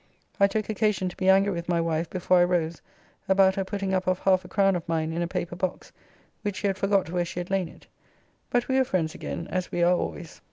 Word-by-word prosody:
I 200 - +6
took 215 +1 -2
occasion 210 -3 0
to - - -12
be 190 -1 +1
angry 195 +1 +4
with 170 0 -5
my 170 -1 +2
wife 165 0 -1
before 185 0 +2
I - - +6
rose 170 -2 -1 0.5
about 190 0 +5
her 195 - -1
putting 195 0 -3
up 185 0 0
of 185 -1 +2
half 185 -1 +2
a - - -11
crown 195 -1 +2
of 170 -2 -5
mine 160 -1 0
in 170 - -2
a 170 - 0
paper 175 0 -4
box, 180 0 -4 0.5
which 205 -2 -3
she - - -4
had 195 -1 +1
forgot 195 -4 +1
where 175 -1 0
she 175 +1 -5
had 175 +2 -6
lain 190 -3 +1
it. - - -16 0.6
But 245 0 +1
we 265 0 +2
were - - +5
friends 165 -9 -1
again 170 - -5
as 185 -1 -2
we 175 - 0
are 175 +1 +5
always. 170 -2 -5
185 Hz, 250 wpm, -26 LUFS, 175-195 Hz, 0.6 s, I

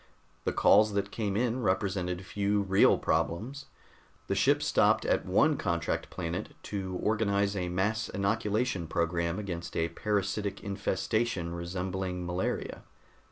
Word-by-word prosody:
The - - +2
calls 105 +1 +5
that 100 0 -1
came 105 -3 -2
in 125 +2 0
represented 95 -3 -1
few 100 +1 0
real 95 0 +5
problems. 130 +11 -1 0.6
The - - -1
ship - - +3
stopped - - +3
at - - +1
one - - +3
contract 85 -1 -1
planet 85 +1 -4
to 95 -3 -4
organize 100 -2 +1
a 90 -2 -2
mass 105 +5 0
inoculation 105 -1 0
program 85 +1 0
against 90 -5 -5
a 85 0 +1
parasitic 100 +2 -2
infestation 100 -1 -1
resembling 90 +1 -3
malaria. 90 +1 -2
100 Hz, 125 wpm, -30 LUFS, 90-105 Hz, 0.6 s, calls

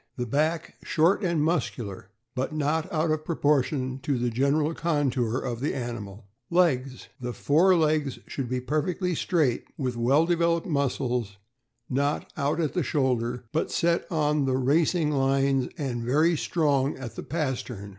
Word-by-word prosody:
— 125 - -46
The 125 - -2
back 155 +7 -1
short 170 +6 +2
and 170 -4 +1
muscular, 115 - -2 0.2
but 130 +3 -2
not 155 +2 0
out 155 0 +1
of 155 0 -1
pro 165 +1 -3
portion 135 -3 +1
to 140 -1 -1
the 120 0 0
general 140 +6 +1
contour 135 -8 0
of 120 -3 -3
the 140 +3 -1
animal. 115 -5 -6 0.2
Legs. 135 -8 +1
— 130 - -28
The 125 0 -3
fore 175 +9 +4
legs 155 -4 +1
should 130 -4 -4
be 125 0 -1
perfectly 165 +7 -1
straight, 155 -7 +1
with 130 -4 -2
well 135 +7 +3
developed 170 -1 +1
muscles; 125 - -1 0.5
not 140 +3 -1
" - - -39
out 145 +2 0
at 170 +2 0
shoulder," 125 -5 0
but 155 - 0
set 170 +2 0
on 150 -3 +1
the 130 -1 +1
racing 150 +4 +2
lines, 135 -1 +2
and 130 -5 -3
very 155 +8 +3
strong 145 -3 +1
at 130 -3 -7
the - - -5
pastern. 130 - -3
140 Hz, 165 wpm, -26 LUFS, 125-160 Hz, 0.5 s, fore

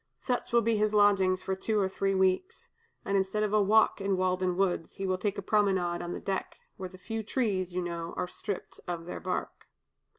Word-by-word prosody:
Such 250 -1 -2
will 235 0 +4
be 225 0 +2
his 215 0 +1
lodgings 195 -3 +4
for 190 - -1
two 215 +3 0
or 195 - +2
three 195 +1 -1
weeks; 190 - 0 0.4
and 200 - 0
instead 195 +2 +1
of 210 -1 -1
a 215 - +5
walk 215 +1 +4
in 195 -1 +1
Walden 185 -1 +1
woods, 180 -4 0
he 195 - -4
will 185 -1 0
take 205 +1 -1
a 200 - -4
promenade 190 -4 +1
on 175 - -4
deck, 195 -1 -3 0.2
where 185 -1 -6
the 185 - -13
few 225 +4 -4
trees, 205 -5 -1
you 180 0 -2
know, 170 -1 -4
are - - -1
stripped 200 +1 -6
of 170 -1 -4
their 180 - -5
bark." 185 0 -4
190 Hz, 210 wpm, -30 LUFS, 185-210 Hz, 0.4 s, a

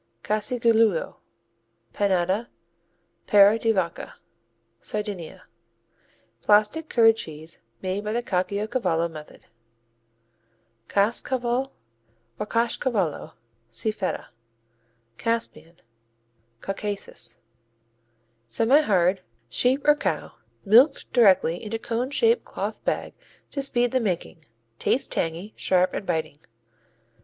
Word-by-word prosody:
Casigiolu, 230 - +1 0.8
Panedda, 195 +3 0 0.8
Pera 205 +2 +6
di 225 0 +2
vacca 185 -5 -3 0.6
Sardinia 205 -6 -5 1.0
Plastic 215 +10 +2
curd 225 -2 +5
cheese, 160 -2 -7 0.2
made 190 +2 -2
by 210 - -3
the 240 +2 -1
Caciocavallo 190 -3 -1
method. 155 -1 -12 1.4
Caskcaval 240 +5 0 0.7
or 210 - -2
Kaschcavallo 230 - -1 0.4
see 120 - -1
Feta. 190 -3 -4 0.9
Caspian 230 -7 -2 0.9
Caucasus 200 +1 -5 1.1
Semihard. 200 - +3 0.3
Sheep 255 - +1
or 295 - +8
cow, 295 - -3 0.3
milked 245 +8 +4
directly 190 -7 +4
into 220 +1 -3
cone 235 +3 -3
shaped 455 - +2
cloth - - -5
bag - - -2 0.4
to 280 - -3
speed 245 -3 +1
the 260 - +2
making. 180 -6 -3 0.4
Tastes 260 - +1
tangy, 170 +6 -3
sharp 185 0 +2
and 200 - -5
biting. 160 -4 -2
210 Hz, 90 wpm, -25 LUFS, 185-240 Hz, 1.4 s, or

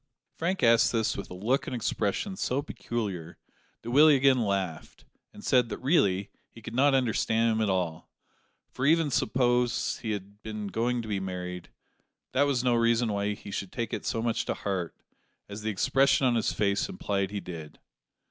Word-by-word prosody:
Frank 180 +4 -2
asked 115 0 +5
this 110 -2 0
with 100 - -6
a 90 - -8
look 115 +9 0
and - - -3
expression 120 - -1
so 140 -6 -1
peculiar 100 - -5 0.5
that 120 - -5
Willie 150 +3 +7
again 135 -2 +4
laughed 95 -6 -3 0.3
and - - -13
said 125 -2 +3
that - - -4
really 100 - +1 0.2
he - - -14
could 115 +1 -9
not 135 +3 +4
understand 115 -2 +2
him 110 0 0
at 110 - +1
all; 90 -4 -2 0.6
for 130 - -5
even 160 -1 +3
suppose 125 +1 +1
he 115 - -5
had 100 0 -5
been 105 -1 -5
going 120 +3 -1
to - - -8
be 105 -2 -1
married, 90 -1 -5 0.6
that 140 +2 +3
was 130 -4 0
no 125 -1 +3
reason 115 -1 +2
why 100 +1 -1
he 100 - -10
should 95 -1 -4
take 120 -2 -4
it - - -3
so 115 - -2
much 115 -1 0
to - - -2
heart, 95 -4 -3 0.5
as 105 +1 -7
the 110 - -2
expression 135 +6 +3
on 125 - +3
his 115 - +1
face 100 - 0
implied 100 - -2
he 100 0 -4
did. 80 -5 -9
115 Hz, 185 wpm, -28 LUFS, 100-125 Hz, 0.6 s, Willie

